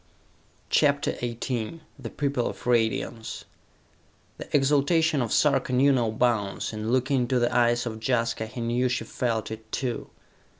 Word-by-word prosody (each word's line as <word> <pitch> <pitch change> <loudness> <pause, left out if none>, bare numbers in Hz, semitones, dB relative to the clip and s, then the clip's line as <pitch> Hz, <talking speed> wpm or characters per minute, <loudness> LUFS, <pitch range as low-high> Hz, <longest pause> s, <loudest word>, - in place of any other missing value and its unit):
CHAPTER 145 -1 +2
XVIII 120 +4 -3 0.2
The - - -6
People 140 -4 -1
of - - -7
Radiance 115 -1 -1 0.9
The - - -8
exaltation 145 +2 +3
of 115 - -2
Sarka 145 -3 +2
knew 135 +3 +5
no 120 -4 +1
bounds, 110 -3 0
and 110 +1 -4
looking 130 +1 +2
into 125 +1 +1
the 120 0 +1
eyes 120 0 +3
of 110 -2 -5
Jaska, 115 -2 0
he 120 +2 -7
knew 120 +2 +1
she 125 -2 -1
felt 110 -1 -2
it, 110 0 -9
too. 125 -4 -3
120 Hz, 145 wpm, -26 LUFS, 115-135 Hz, 0.9 s, knew